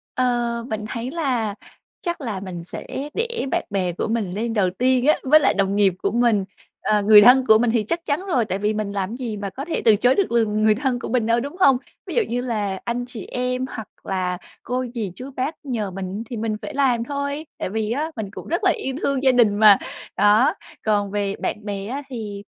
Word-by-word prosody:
Ờ, 240 -2 0
mình 215 -1 -3
thấy 240 +2 -4
là 250 -10 -1 0.5
chắc 345 -4 -3
là 215 -8 -4
mình 175 -3 -7
sẽ - - -7 0.3
để 465 - -2
bạn - - 0
bè 185 -3 0
của - - -3
mình 220 -5 -1
lên 225 +2 -2
đầu 190 -4 +2
tiên 255 +1 +2
á, 305 - +6
với 305 +4 +6
lại - - +3
đồng 195 0 +1
nghiệp 195 -3 +4
của - - +1
mình, 230 -4 +2 0.4
ờ, 210 -1 +2
người 210 0 +8
thân 255 +3 +7
của 220 - +7
mình 235 0 +2
thì 230 -2 +2
chắc 335 0 -1
chắn 295 +3 0
rồi, 255 -11 +2
tại 195 -2 -2
vì 210 +1 0
mình 210 -1 -2
làm 200 +3 -3
gì 240 -4 -4
mà 200 -1 -4
có 270 +8 -6
thể 330 - -3
từ 220 -3 +6
chối 245 +5 +3
được, 395 - +1
ừm, 215 -2 +1
người 215 -1 +5
thân 255 0 -1
của - - -6
mình 235 -2 +1
đâu, 230 +1 +3
đúng 285 +7 -6
hông? 270 -6 +6 0.3
Ví - - -5
dụ 470 - +4
như 245 +1 -1
là 210 -6 -2
anh 245 +1 -2
chị 230 -5 -8
em, 250 +1 -2
hoặc 220 -5 -7 0.2
là 180 -2 -2 0.2
cô 255 +1 -2
dì 210 -7 -3
chú 255 +7 -8
bác 270 +5 -1
nhờ 220 -7 -2
mình 195 +3 -5
thì 235 - -6
mình 215 -1 -2
phải - - -6
làm 255 -4 +2
thôi, 280 +3 -3
tại - - -2
vì 220 0 -2
á 300 +6 -1
mình 210 -3 -4
cũng - - -9
rất 345 +6 -1
là 370 - +5
yêu 265 - -3
thương 275 -2 0
gia 265 -1 +5
đình 235 -5 +4
mà. 210 -2 +8 0.4
Đó, 210 - +4 0.3
còn 205 -2 +1
về 200 -1 -1
bạn 210 - -3
bè 200 -1 -4
á 275 +5 -4
thì, 210 -5 -6
230 Hz, 240 wpm, -22 LUFS, 205-260 Hz, 0.5 s, người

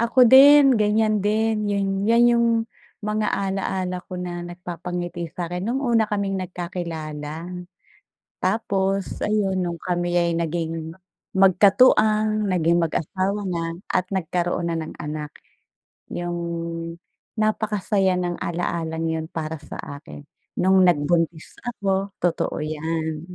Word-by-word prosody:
Ako 235 +2 +5
din, 275 +1 +8
ganyan 215 0 +2
din 215 0 +1
yung 200 -1 0 0.2
'yan 235 +1 +5
yung 235 0 +3 0.5
mga 210 0 -1
ala-ala 190 -2 -2
ko 185 - -7
na 175 -1 -5
nagpapangiti 175 0 -5
sa'kin 180 +1 -4
nung 245 +4 -1
una 235 -5 +3
kaming 200 -2 -2
nagkakilala. 170 -3 -5 1.0
Tapos 195 -1 0
ayun, 205 -3 +1
nung 170 -1 -4
kami 175 0 -1
ay 170 -1 +2
naging 165 -1 -3 0.4
magkatuwang, 215 +2 +4
naging 170 -1 +2
mag-asawa 190 +5 -1
na, 165 -1 -3
at, 185 0 +1
nagkaroon 175 -1 -1
na 170 - -1
ng 160 0 -6
anak. 150 0 -5 0.8
Yung 175 0 -3 1.0
napakasaya 210 -3 +1
ng 175 -1 -2
ala-alang 165 -1 -2
'yun 160 0 -2
para 160 0 -4
sa 150 - -9 0.2
akin, 145 -1 -11 0.4
nung 190 +1 +4
nagbuntis 165 0 +1
ako. 200 -4 -1
Totoo 175 -2 0
yan. 155 +1 -3
180 Hz, 115 wpm, -23 LUFS, 170-210 Hz, 1.0 s, din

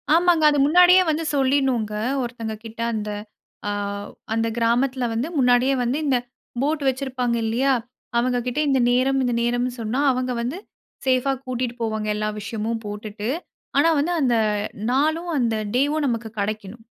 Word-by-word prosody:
ஆமாங்க, 340 -2 +4
அது 290 - +1
முன்னாடியே 360 +4 +7
வந்து 315 +1 0
சொல்லிடணுங்க, 260 -5 +1 0.3
ஒருத்தங்க 230 -2 -5
கிட்ட 225 +1 -8
அந்த 210 -1 -3 0.6
அ - - 0 0.6
அந்த 225 0 +1
கிராமத்துல 245 +2 +1
வந்து 235 +6 -1
முன்னாடியே 250 +1 +4
வந்து 250 +4 0
இந்த 265 -3 +3 0.4
போட் 295 +1 0
வெச்சிருப்பாங்க 255 -2 -1
இல்லையா? 260 +5 +2 0.4
அவங்க 250 +1 +2
கிட்ட 250 +4 -1
இந்த 265 -1 +3
நேரம், 265 +2 +2
இந்த 245 -1 0
நேரம்னு 245 +1 0
சொன்னா 225 +5 -1
அவங்க 255 0 -1
வந்து 255 +9 -3 0.5
சேஃபா 260 +1 +2
கூட்டிட்டு 250 -1 -3
போவாங்க, 220 -1 -2
எல்லா 215 0 -1
விஷயமும் 220 +2 -3
போட்டுட்டு. 210 +1 -5 0.5
ஆனா 310 +4 +5
வந்து 340 +5 0
அந்த 245 -3 +3 0.6
நாளும் 315 +6 +1
அந்த 230 -3 +1 0.2
டேயும் 290 +3 +2
நமக்கு 230 -2 -2
கெடைக்கணும். 215 +2 -4
250 Hz, 145 wpm, -23 LUFS, 225-275 Hz, 0.6 s, முன்னாடியே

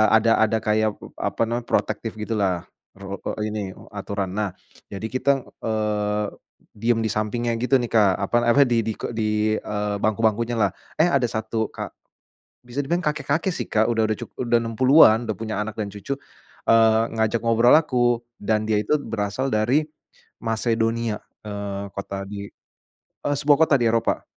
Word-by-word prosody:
ada 110 +1 +4
ada 110 +1 +2
kayak, 110 0 +2
eee, - - -11 0.2
apa - - -6
namanya, 120 +1 -2
protektif 115 - 0
gitulah, 100 -5 -1 0.3
rul 100 0 -5
eee 105 - -4
ini, 105 0 -3
eee, - - -15
aturan. 100 -1 -3
Nah, 105 -2 0 0.4
jadi 100 +2 -5
kita 130 +3 -1 0.3
eee, 105 -1 0 0.5
diam 115 +2 +1
di - - +2
sampingnya 120 +3 -1
gitu 125 +4 +1
nih 120 - -2
Kak, 105 -3 +6 0.2
apa, - - -1 0.2
apa 140 - +5
di 115 -2 +2
di - - +1
ko - - -3
di, 110 -1 +1
eee, 105 -1 -2
bangku-bangkunya 115 +2 +1
lah, 100 -4 +3 0.3
eh, 165 - +6
ada 140 -6 +2
satu 110 0 -2
ka - - -5 0.8
bisa 125 +4 -3
dibilang 170 +5 -1
kakek-kakek 150 +4 0
sih, - - -4
Kak, 110 0 +3
udah 115 -1 +1
udah 110 - 0
cukup, - - -9
udah 120 - +5
60-an 115 +1 +6
udah 105 - 0
punya 110 -2 -3
anak 110 +1 -5
dan 105 -2 -4
cucu, 135 +7 -4 0.5
eee, 110 -1 +5
ngajak 110 +1 +1
ngobrol 115 +3 +5
aku 120 -6 +2 0.2
dan 110 +1 +1
dia 105 -1 +1
itu 150 +9 +1
berasal 115 +1 -2
dari 125 +9 +2 0.6
Macedonia, 115 0 0 0.3
eee, 100 -1 -4
kota 100 0 -5
di, 100 -1 -6 0.8
eee, 145 - +1
sebuah 145 0 +4
kota 140 - +4
di 120 - +2
Eropa, 115 0 0
110 Hz, 170 wpm, -23 LUFS, 105-120 Hz, 0.8 s, Kak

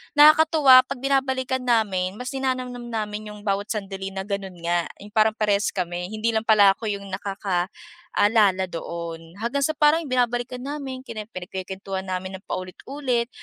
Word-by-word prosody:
nakakatuwa 300 -3 +7
pag 275 -2 -5
binabalikan 265 -1 0
namin, 200 -6 +1
mas 250 0 -4
ninanamnam 255 -2 -2
namin 210 -1 -4
yung 210 - -11
bawat 200 0 0
sandali 195 -2 -4
na 190 - -3
ganun 195 -2 -4
nga. 170 0 +1 0.2
Yung 205 - -10
parang 220 0 +4
parehas 210 -1 +1
kami, 180 0 -3
hindi 215 +2 0
lang 220 - +1
pala 205 -3 +6
ako 225 - -8
yung 200 -1 -5
nakakaalala 200 - 0
doon. 165 0 -6
Hanggang 240 +5 -1
sa 310 - +2
parang 305 +2 +4
binabalikan 245 -1 0
namin, 275 -2 -5
kine 215 -2 -5
pinagkukwentuhan 190 +1 -5
namin 185 +1 -4
ng - - -31
paulit-ulit, 240 +6 -2
215 Hz, 150 wpm, -24 LUFS, 190-255 Hz, 0.2 s, nakakatuwa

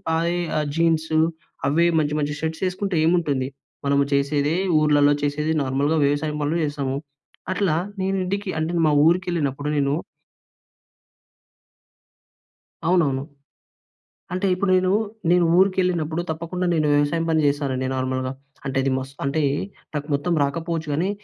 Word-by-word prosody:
అదే 170 +2 0 0.2
ఆహ్, 150 - 0
జీన్సు 160 -1 +2 0.5
అవే 165 +4 +3
మంచి, 150 -1 0
మంచి 150 0 -1
షర్ట్స్ 160 +2 -3
వేసుకుంటే 185 +1 -2
ఏముంటుంది? 150 -7 +1 0.4
మనము 140 0 +3
చేసేదే 145 +2 +1 0.3
ఊర్లలలో 145 -1 +4
చేసేదే 150 +2 0
నార్మల్‍గా 140 +4 +1
వ్యవసాయం 150 +1 0
పనులు 160 +4 0
చేస్తాము. 140 -2 -2 0.5
అట్లా 185 -4 +1 0.3
నేను 190 +1 0
ఇంటికి 200 +1 -3
అంటే 160 +1 -1
మా 155 - +4
ఊరికి 175 +4 +3
వెళ్ళినప్పుడు 145 -3 -1
నేను 140 -1 +1 2.9
అవునవును. 145 -6 +2 1.1
అంటే 185 +2 0
ఇప్పుడు 185 +2 -1
నేను, 185 0 +2 0.4
నేను 180 -1 +4
ఊరికెళ్ళినప్పుడు 180 -4 +2
తప్పకుండా 170 +3 -3
నేను 155 -2 +2
వ్యవసాయం 145 +3 +1
పని 160 -1 +3
చేశానండి 135 -3 -1
నార్మల్‌గా. 130 0 -2 0.3
అంటే 135 -1 -2
అది 135 - +1
మస్త్ 135 +1 -7
అంటే 140 +3 0 0.5
నాకు 145 -1 -3
మొత్తం 155 +5 0
రాకపోవచ్చు 165 +2 -2
గానీ 170 +6 0
155 Hz, 125 wpm, -23 LUFS, 140-170 Hz, 2.9 s, ఊర్లలలో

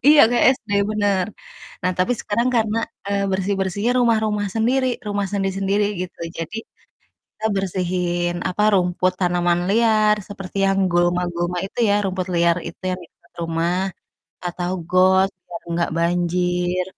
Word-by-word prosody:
Iya, 300 -1 +8
kayak 245 - +3 0.2
SD, 215 - -16 0.2
bener. 205 -3 +1 0.6
Nah, 185 0 +1
tapi 185 +7 +2
sekarang 235 +4 0
karena, 220 0 +1 0.3
eee, 200 0 0
bersih-bersihnya 195 +3 0
rumah-rumah 220 -3 +2
sendiri, 255 +4 +2 0.2
rumah 205 -1 -1
sendiri-sendiri 195 +1 0 0.2
gitu, 180 - -8 0.2
jadi 165 +7 -5 0.8
kita 220 - -3
bersihin, 175 -2 -1
apa, 195 +3 -1
rumput, 180 0 +2
tanaman 175 -1 +2
liar, 215 0 +4
seperti 195 -1 -8
yang 195 0 +2
gulma-gulma 175 0 0
itu 195 - -14
ya, 200 - +4
rumput 185 -1 -2
liar 170 0 +3
itu 165 - -13
yang 185 0 -3
dekat - - -26
rumah 165 +1 0 0.7
atau 175 0 -3 0.2
got 190 +1 +4 0.2
biar 170 -1 -8 0.2
gak 170 - 0
banjir, 175 +1 0
185 Hz, 135 wpm, -21 LUFS, 175-205 Hz, 0.8 s, Iya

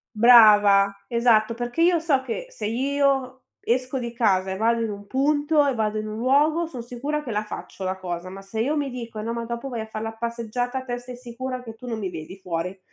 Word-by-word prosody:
Brava. 210 -4 +7
Esatto 230 -2 +3
perché 240 +5 -4
io 345 0 +5
so 305 -5 +2
che 260 - -5
se - - -5
io 270 +2 0 0.2
esco 255 +2 -1
di 235 -1 -4
casa 195 -5 +1
e 190 - -3
vado 230 +1 +2
in 225 - -1
un 205 0 -8
punto, 290 +4 +2
e 275 - +1
vado 215 -1 -1
in 215 - -4
un 215 +1 -5
luogo, 295 +7 +3
son 255 -7 -7
sicura 275 +6 -3
che 265 - -7
la 210 -1 -1
faccio 205 -2 -8
la 185 0 -1
cosa; 175 -1 -5
ma 195 +1 -9
se 220 +3 -5
io 290 +6 +1
mi 285 -2 -1
dico: 230 -3 -6
"No, 230 +2 -3
ma 235 0 -4
dopo 235 +3 -5
vai 235 - -4
a 220 - -5
far 215 0 -6
la 225 0 -4
passeggiata", 235 +3 -3
te 245 -1 -3
stai 245 0 -9
sicura 250 +1 -6
che 225 -2 -10
tu 250 - -11
non 225 -2 -3
mi 190 -4 -3
vedi 165 +2 -8
fuori. 180 0 -4
235 Hz, 230 wpm, -24 LUFS, 215-260 Hz, 0.2 s, Brava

